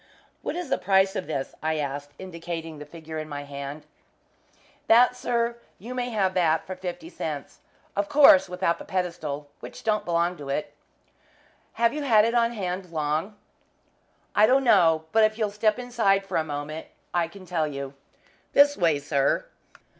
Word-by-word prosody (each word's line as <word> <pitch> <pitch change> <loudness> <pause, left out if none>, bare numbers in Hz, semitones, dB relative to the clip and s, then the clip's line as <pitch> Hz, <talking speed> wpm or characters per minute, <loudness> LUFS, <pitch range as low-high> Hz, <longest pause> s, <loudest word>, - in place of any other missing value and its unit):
"What - - -3
is 355 -5 -4
the - - +2
price 190 +1 +3
of 185 - -3
this?" 140 -4 -3
I 160 0 0
asked, 145 0 -4
indicating 165 -3 -6
the 150 - -9
figure 160 0 -7
in 155 0 -6
my 145 -1 -5
hand. 140 +1 -7 1.0
"That, 245 +2 +6
sir; 235 -1 -1 0.2
you 235 +7 -8
may 250 -1 -2
have 195 -5 0
that 165 -3 +2
for 185 - -6
fifty 185 - -6
cents - - -6 0.4
of 300 - -1
course 275 -11 +7
without 180 -1 0
the - - -7
pedestal, 160 -6 -3
which - - -10
don't 215 -1 +1
belong 170 +1 0
to 145 -2 -8
it." 145 +2 -2 1.0
"Have 235 0 +2
you 300 - -3
had 225 -6 +5
it 230 - 0
on 235 0 +2
hand 185 -3 -4
long?" 155 +5 -1 1.0
"I 210 +1 +5
don't 265 +3 +4
know, 165 -9 +4
but 220 0 +4
if 215 0 +2
you'll 215 -3 0
step 215 +1 +1
inside 225 -6 +1
for - - -2
a 160 - +2
moment 150 +1 -5 0.3
I 175 -2 +1
can 185 +2 -13
tell 165 -4 0
you. 140 -2 -6 0.6
This 285 0 +6
way, 165 -5 +2
sir." 140 -1 0
180 Hz, 175 wpm, -26 LUFS, 155-220 Hz, 1.0 s, course